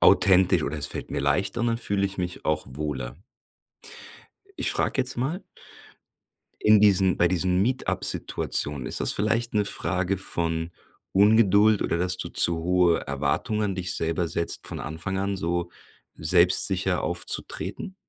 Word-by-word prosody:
authentisch 95 Hz, -3 st, +4 dB
oder 75 Hz, +1 st, -3 dB
es -, -, -1 dB
fällt -, -, -6 dB
mir -, -, -2 dB
leichter 90 Hz, +11 st, 0 dB
und -, -, +1 dB
dann 115 Hz, 0 st, 0 dB
fühle 100 Hz, -4 st, -1 dB
ich 95 Hz, -, -9 dB
mich 90 Hz, 0 st, -5 dB
auch 80 Hz, 0 st, -1 dB
wohler.“ 65 Hz, -3 st, -5 dB, 1.4 s
Ich -, -, +1 dB
frage -, -, 0 dB
jetzt 130 Hz, -1 st, -3 dB
mal 150 Hz, +10 st, -3 dB, 1.2 s
in 105 Hz, -1 st, +6 dB
diesen 95 Hz, -3 st, +4 dB
bei 85 Hz, -, +3 dB
diesen 90 Hz, +1 st, +1 dB
Meet-Up-Situationen, 75 Hz, -, -1 dB
ist -, -, -3 dB
das -, -, +2 dB
vielleicht 115 Hz, +3 st, 0 dB
'ne 105 Hz, -, +2 dB
Frage 90 Hz, -1 st, -1 dB
von 85 Hz, -2 st, -3 dB, 0.4 s
Ungeduld 105 Hz, 0 st, +4 dB
oder, 85 Hz, -, -1 dB
dass 90 Hz, +1 st, 0 dB
du -, -, -4 dB
zu 85 Hz, -1 st, +3 dB
hohe 90 Hz, -1 st, +2 dB
Erwartung 70 Hz, +10 st, -1 dB
an 100 Hz, -2 st, -1 dB
dich 90 Hz, 0 st, -2 dB
selber 80 Hz, +1 st, -1 dB
setzt, 85 Hz, -, -3 dB
von -, -, -5 dB
Anfang 90 Hz, +5 st, -5 dB
an 100 Hz, 0 st, -2 dB
so 85 Hz, 0 st, -2 dB, 0.5 s
selbstsicher 90 Hz, +2 st, +3 dB
aufzutreten? 85 Hz, -, -3 dB
90 Hz, 150 wpm, -25 LUFS, 85-100 Hz, 1.4 s, in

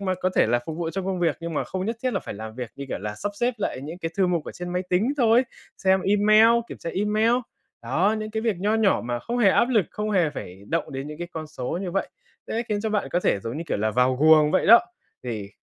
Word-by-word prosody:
mà 190 Hz, -2 st, -1 dB
có 185 Hz, 0 st, -1 dB
thể -, -, +5 dB
là 120 Hz, +2 st, +2 dB
phục 160 Hz, -, -5 dB
vụ 165 Hz, -1 st, -2 dB
trong 190 Hz, +2 st, -4 dB
công 190 Hz, -1 st, -2 dB
việc 165 Hz, -4 st, +1 dB
nhưng 165 Hz, -1 st, -5 dB
mà -, -, -1 dB
không 185 Hz, 0 st, -4 dB
nhất 225 Hz, +1 st, -2 dB
thiết 255 Hz, -1 st, 0 dB
là -, -, -1 dB
phải -, -, -7 dB
làm 110 Hz, +1 st, -8 dB
việc, 125 Hz, -1 st, -6 dB
như 140 Hz, -, -6 dB
kiểu -, -, -3 dB
là 105 Hz, +1 st, -5 dB
sắp 205 Hz, -, -4 dB
xếp 245 Hz, +1 st, +1 dB
lại 205 Hz, -, -3 dB
những 155 Hz, +5 st, -7 dB
cái 165 Hz, -2 st, -4 dB
thư 195 Hz, -2 st, +3 dB
mục 170 Hz, -4 st, 0 dB
ở -, -, -7 dB
trên 175 Hz, 0 st, -7 dB
máy 180 Hz, 0 st, -1 dB
tính 200 Hz, +9 st, +2 dB
thôi, 240 Hz, -1 st, +4 dB, 0.3 s
xem 190 Hz, -1 st, +3 dB
email, 215 Hz, +2 st, +5 dB, 0.2 s
kiểm -, -, -8 dB
tra 165 Hz, -, -5 dB
email. 210 Hz, +3 st, +2 dB, 0.5 s
Đó, 170 Hz, -, +1 dB
những 215 Hz, 0 st, -5 dB
cái 220 Hz, 0 st, -2 dB
việc 225 Hz, -4 st, 0 dB
nho 205 Hz, +4 st, +1 dB
nhỏ 220 Hz, -3 st, +3 dB
mà 120 Hz, 0 st, -2 dB
không 235 Hz, -, -4 dB
hề 220 Hz, -5 st, +5 dB
áp 235 Hz, -, +3 dB
lực, 220 Hz, -9 st, +2 dB
không 210 Hz, 0 st, -3 dB
hề 180 Hz, -6 st, +2 dB
phải 95 Hz, -9 st, -9 dB
động 165 Hz, -2 st, -2 dB
đến 135 Hz, +1 st, -5 dB
những 150 Hz, 0 st, -8 dB
cái 175 Hz, 0 st, -5 dB
con 160 Hz, -1 st, -5 dB
số 150 Hz, +1 st, -4 dB
như 185 Hz, -, -3 dB
vậy 195 Hz, -, -1 dB, 0.4 s
sẽ 230 Hz, -, -2 dB
khiến 210 Hz, -1 st, -1 dB
cho 220 Hz, +1 st, -2 dB
bạn 210 Hz, -1 st, -1 dB
có 175 Hz, -, +2 dB
thể 100 Hz, -, +1 dB
giống 115 Hz, +5 st, -5 dB
như 165 Hz, -, -4 dB
kiểu -, -, -1 dB
là 110 Hz, +1 st, 0 dB
vào 125 Hz, +3 st, +2 dB
guồng 155 Hz, +1 st, +6 dB
vậy 185 Hz, -, +2 dB
đó. 235 Hz, +3 st, +9 dB, 0.4 s
Thì 110 Hz, -5 st, -5 dB
180 Hz, 290 wpm, -24 LUFS, 145-210 Hz, 0.5 s, đó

